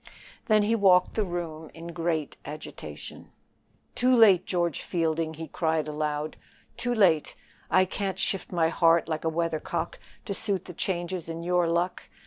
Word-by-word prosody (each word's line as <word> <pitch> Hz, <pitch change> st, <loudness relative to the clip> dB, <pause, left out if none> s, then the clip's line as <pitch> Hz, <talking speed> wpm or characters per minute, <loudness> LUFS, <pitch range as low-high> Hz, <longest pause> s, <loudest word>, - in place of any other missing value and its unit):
Then 215 Hz, -1 st, +4 dB
he 215 Hz, +2 st, +2 dB
walked 190 Hz, -4 st, +4 dB
the 215 Hz, -, +1 dB
room 170 Hz, -4 st, -5 dB
in 165 Hz, +1 st, -8 dB
great 165 Hz, -3 st, -1 dB
agitation. 155 Hz, +1 st, -9 dB, 0.6 s
"Too 255 Hz, +1 st, +3 dB
late, 210 Hz, -7 st, +6 dB
George 175 Hz, -3 st, 0 dB
Fielding," 160 Hz, -1 st, -1 dB
he 160 Hz, +1 st, -6 dB
cried 160 Hz, 0 st, 0 dB
aloud 150 Hz, 0 st, -2 dB, 0.4 s
"too 245 Hz, -1 st, -1 dB
late; 175 Hz, -8 st, +3 dB, 0.3 s
I 185 Hz, 0 st, +5 dB
can't 190 Hz, 0 st, -3 dB
shift 190 Hz, 0 st, -2 dB
my 165 Hz, -3 st, +2 dB
heart 165 Hz, 0 st, +4 dB
like 160 Hz, 0 st, -3 dB
a -, -, +3 dB
weathercock 165 Hz, -1 st, -2 dB, 0.3 s
to 200 Hz, -, -2 dB
suit 195 Hz, -3 st, -1 dB
the 180 Hz, -, -8 dB
changes 175 Hz, -1 st, -3 dB
in 165 Hz, 0 st, -5 dB
your 175 Hz, 0 st, +2 dB
luck. 170 Hz, +2 st, -1 dB
170 Hz, 155 wpm, -27 LUFS, 160-190 Hz, 0.6 s, late